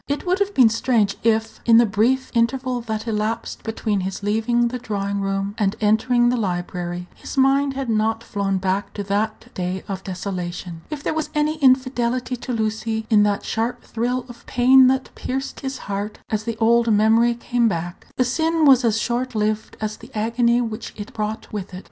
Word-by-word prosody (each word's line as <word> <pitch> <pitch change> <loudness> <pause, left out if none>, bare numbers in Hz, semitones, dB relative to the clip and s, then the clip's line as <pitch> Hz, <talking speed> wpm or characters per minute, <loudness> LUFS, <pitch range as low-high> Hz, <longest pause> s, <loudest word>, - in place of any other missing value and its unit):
It 285 +5 -2
would 365 +2 +1
have 405 0 0
been 245 -4 +7
strange 220 -3 +1
if, 225 -1 +1
in 230 -1 +6
the 235 - +6
brief 230 +6 +1
interval 250 +1 0
that 220 -1 -4
elapsed 220 +1 -2
between 220 -2 -2
his 190 +2 -4
leaving 230 +3 +1
the 250 +1 -4
drawing 200 -3 -2
room 195 0 -2
and 205 -1 +1
entering 240 +3 +3
the 250 - +1
library, 175 -3 -3
his - - -9
mind 270 +1 +3
had 270 -1 -3
not 225 0 0
flown 200 -3 -1
back 190 +1 -2
to 205 - -3
that 215 +4 -2
day 180 +1 -3
of 195 -1 -5
desolation. 180 -3 -5
If 300 -2 -6
there - - 0
was 315 -1 -2
any 300 +1 +1
infidelity 255 -2 +2
to 250 - -6
Lucy 220 0 -2
in 210 -1 +6
that 200 - -2
sharp 225 +2 -2
thrill 245 +2 -2
of 240 -1 -12
pain 255 +1 +6
that 260 0 0
pierced 265 +1 -4
his 265 -1 -4
heart 205 +1 -4
as 215 0 -1
the 230 -1 -3
old 235 +1 +3
memory 225 +3 +4
came 240 0 +1
back, 175 -2 -4
the 255 - +2
sin 320 +5 +1
was 265 -3 +6
as 225 -2 +2
short 250 +1 -2
lived 215 0 -1
as 215 0 -3
the - - -13
agony 235 +2 +2
which 225 -1 -5
it 215 +5 -8
brought 215 +1 -4
with 200 -2 -5
it. - - -6
225 Hz, 190 wpm, -22 LUFS, 205-250 Hz, -, been